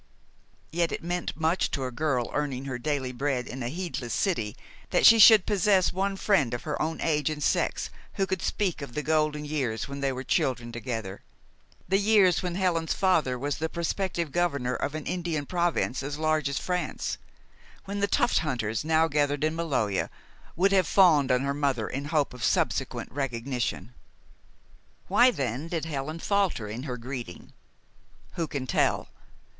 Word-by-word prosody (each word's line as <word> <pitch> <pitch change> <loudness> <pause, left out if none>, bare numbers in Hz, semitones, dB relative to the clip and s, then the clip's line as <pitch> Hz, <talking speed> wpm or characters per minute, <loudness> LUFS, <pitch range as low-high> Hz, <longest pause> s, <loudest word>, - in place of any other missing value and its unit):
Yet 170 0 0
it - - -4
meant 175 -1 -3
much 160 +3 +1
to 135 - -3
a 125 - -4
girl 130 -2 -1
earning 135 -3 -2
her 130 -3 -4
daily 135 -1 -2
bread 130 -1 -1
in 130 +1 -7
a 120 - -2
heedless 150 -7 -4
city 115 - -1 0.3
that - - +3
she 225 - +9
should 215 -3 +9
possess 195 -2 +3
one 195 +2 -1
friend 145 - +2
of 120 - -7
her 150 - -3
own 160 +1 -2
age 150 -2 +1
and 150 -1 -4
sex - - 0 0.2
who 195 - +1
could 190 -2 -2
speak 190 -7 -1
of 140 -4 -8
the 150 - -2
golden 155 -1 +1
years 130 -8 -2
when 140 0 -6
they 140 -1 0
were 130 0 -5
children 120 -3 0
together, 115 -5 -5 0.7
the 195 +3 +3
years 200 -4 +4
when 180 -2 -3
Helen's 175 -4 0
father 160 -10 +2
was 145 +3 -3
the 160 +1 -1
prospective 170 -1 -2
governor 140 -8 0
of 140 +3 -3
an 155 - -5
Indian 170 -5 -2
province 170 -6 0
as 145 +1 -4
large 155 -2 +1
as 140 - -2
France; 180 -1 -2 0.7
when 200 +1 -4
the 200 - +2
tuft - - +2
hunters 120 -8 -2
now 160 +1 +3
gathered 145 -1 0
in 155 +1 +1
Maloja 135 - -1 0.5
would 195 +3 +3
have 190 -4 +3
fawned 150 -4 +5
on 125 0 +3
her 140 0 -1
mother 140 -6 0
in 135 +2 -4
hope 145 -3 0
of 125 -2 -8
subsequent - - 0
recognition. 125 -4 -3 1.1
Why, 245 +1 +6
then, 135 - -3
did 165 -2 -3
Helen 155 0 -4
falter 195 - 0
in 110 +4 -5
her 125 - -3
greeting? 120 -6 -7 0.8
Who 165 -2 -2
can 140 -3 -4
tell? - - +1
150 Hz, 175 wpm, -27 LUFS, 130-175 Hz, 1.1 s, she